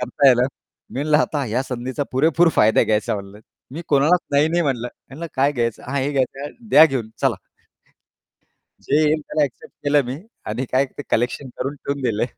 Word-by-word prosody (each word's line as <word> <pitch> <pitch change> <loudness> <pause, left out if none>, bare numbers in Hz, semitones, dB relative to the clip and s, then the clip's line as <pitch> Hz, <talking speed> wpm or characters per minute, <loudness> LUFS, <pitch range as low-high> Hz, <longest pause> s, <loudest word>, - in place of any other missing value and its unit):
करताय 130 +1 +4
ना!" 120 - +2 0.5
मी 130 - -4
म्हणलं 150 0 +3
आता 150 -2 0
ह्या 120 +3 -1
संधीचा 130 +2 -4
पुरेपूर 165 +5 +4
फायदा 110 +1 +4
घ्यायचा 105 0 0
म्हणलं 100 0 -8 0.3
मी 160 +4 -6
कोणालाच 150 +5 +4
नाही 145 +2 +3
नाही 170 +1 +1
म्हटलं. 125 -5 -1 0.2
म्हणलं, 155 +5 -7
"काय 140 +2 +2
घ्यायचं" 115 -3 -2
हां, 140 +1 -1
हे 140 +2 -1
घ्यायचं 135 +1 -2 0.2
द्या 155 - +8
घेऊन. 130 -8 -1
चला. - - +2 1.5
जे 140 - +1
येईल 155 0 +2
त्याला 150 0 -1
ॲक्सेप्ट 135 -4 -4
केलं 145 0 +4
मी 125 +2 -4 0.3
आणि 120 +5 -2
काय 130 +2 +4
तर 145 - -3
कलेक्शन 125 +3 0
करून 135 +2 -2
ठेवून 140 0 -4
दिले. 115 -2 0
135 Hz, 185 wpm, -21 LUFS, 125-145 Hz, 1.5 s, द्या